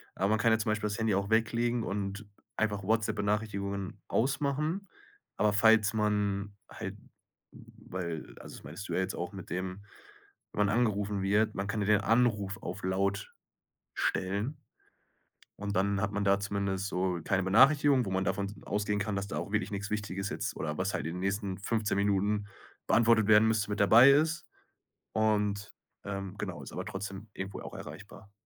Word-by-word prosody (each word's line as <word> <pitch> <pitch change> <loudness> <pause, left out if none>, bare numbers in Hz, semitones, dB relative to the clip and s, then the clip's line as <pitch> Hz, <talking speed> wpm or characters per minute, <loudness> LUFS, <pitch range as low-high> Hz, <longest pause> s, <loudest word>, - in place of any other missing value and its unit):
Aber 95 - +1
man 110 0 +2
kann 115 -1 +4
ja 110 - +3
zum 110 - -1
Beispiel 105 0 -1
das 105 - -3
Handy 110 -3 +2
auch 100 +1 -1
weglegen 115 +1 +1
und 100 +1 -4 0.3
einfach 105 -3 -1
WhatsApp-Benachrichtigungen 100 -2 -1
ausmachen. 150 - 0 0.5
Aber 105 0 +3
falls 110 +1 +5
man 105 -2 0
halt - - -6 0.6
weil 85 -4 -7
also - - -10
das - - -14
meintest 85 +8 -8
du - - -2
ja - - +1
jetzt 95 +1 -2
auch 90 +2 -4
mit 95 -2 -9
dem 95 +3 -4 0.7
wenn 105 0 +2
man 105 +3 +1
angerufen 105 -4 0
wird, 105 +2 +2
man 100 - -2
kann 105 +1 -2
ja 100 - -1
den 105 -1 +4
Anruf 110 -2 +2
auf 105 - -6
Laut 100 +2 -1 0.6
stellen 100 +8 -1 1.1
und 100 0 -3
dann 100 +1 +1
hat 100 +1 -1
man 100 - -1
da 100 0 +4
zumindest 100 -1 -2
so 90 -1 -1
keine 95 -1 +1
Benachrichtigung, 135 +7 +5
wo 95 - -4
man 95 0 0
davon 100 -1 -1
s 100 - -7
ausgehen 105 0 0
kann, 100 0 -2
dass 100 0 -2
da - - -4
auch 100 - -5
wirklich 110 0 0
nix 105 0 -4
Wichtiges 100 -2 -2
jetzt - - -3
oder - - -3
was - - -1
halt - - -2
in 85 - -3
den 90 - -5
nächsten 100 0 -2
15 105 0 -1
Minuten 100 +1 +1 0.4
beantwortet 115 -2 +4
werden 110 +1 +6
müsste, 110 -2 +1
mit 105 - -2
dabei 120 +6 +8
ist, 160 +4 +2 0.7
und, 105 -2 +1 0.3
ähm, 100 -1 -5
genau, 95 -4 -5
ist - - -9
aber - - -5
trotzdem 100 +2 -6
irgendwo 95 +1 -6
auch - - -8
erreichbar. 100 +1 -10
100 Hz, 180 wpm, -30 LUFS, 100-110 Hz, 1.1 s, dabei